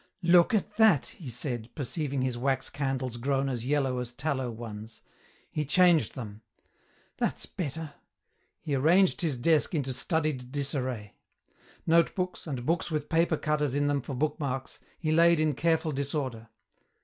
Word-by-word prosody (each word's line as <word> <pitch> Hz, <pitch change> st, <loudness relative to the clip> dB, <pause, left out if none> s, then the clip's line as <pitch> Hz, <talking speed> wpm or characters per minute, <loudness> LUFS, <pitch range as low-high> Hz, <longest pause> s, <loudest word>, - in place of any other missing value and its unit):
"Look 175 Hz, +6 st, +5 dB
at 210 Hz, 0 st, -2 dB
that," 215 Hz, -11 st, +5 dB
he 155 Hz, -7 st, -9 dB
said, 120 Hz, -1 st, -2 dB
perceiving 140 Hz, -2 st, -2 dB
his 130 Hz, -2 st, -1 dB
wax 130 Hz, +2 st, 0 dB
candles 130 Hz, -3 st, -2 dB
grown 135 Hz, +2 st, 0 dB
as 125 Hz, -2 st, -3 dB
yellow 135 Hz, -3 st, +1 dB
as 125 Hz, -1 st, -5 dB
tallow 135 Hz, -2 st, -2 dB
ones. 110 Hz, -1 st, -8 dB, 0.5 s
He 150 Hz, -, -1 dB
changed 170 Hz, +2 st, +4 dB
them. 110 Hz, -4 st, -7 dB, 0.8 s
"That's -, -, -1 dB
better." 155 Hz, -2 st, -5 dB, 0.7 s
He 150 Hz, -, -3 dB
arranged 170 Hz, +8 st, +4 dB
his 155 Hz, -7 st, 0 dB
desk 155 Hz, +5 st, +2 dB
into 135 Hz, -4 st, 0 dB
studied 150 Hz, -4 st, -1 dB
disarray. 130 Hz, -7 st, -3 dB, 0.7 s
Notebooks, 170 Hz, +2 st, +1 dB
and 130 Hz, -5 st, -4 dB
books 165 Hz, +3 st, 0 dB
with 150 Hz, -2 st, -3 dB
paper 165 Hz, -1 st, +2 dB
cutters 150 Hz, -3 st, 0 dB
in 145 Hz, 0 st, +1 dB
them 145 Hz, -1 st, +1 dB
for 135 Hz, -, -6 dB
book 150 Hz, +5 st, -1 dB
marks, 135 Hz, -2 st, -4 dB, 0.2 s
he 155 Hz, -2 st, -1 dB
laid 170 Hz, +1 st, +5 dB
in 155 Hz, -1 st, +2 dB
careful 160 Hz, +2 st, +1 dB
disorder. 135 Hz, -5 st, -3 dB
140 Hz, 150 wpm, -29 LUFS, 130-160 Hz, 0.8 s, Look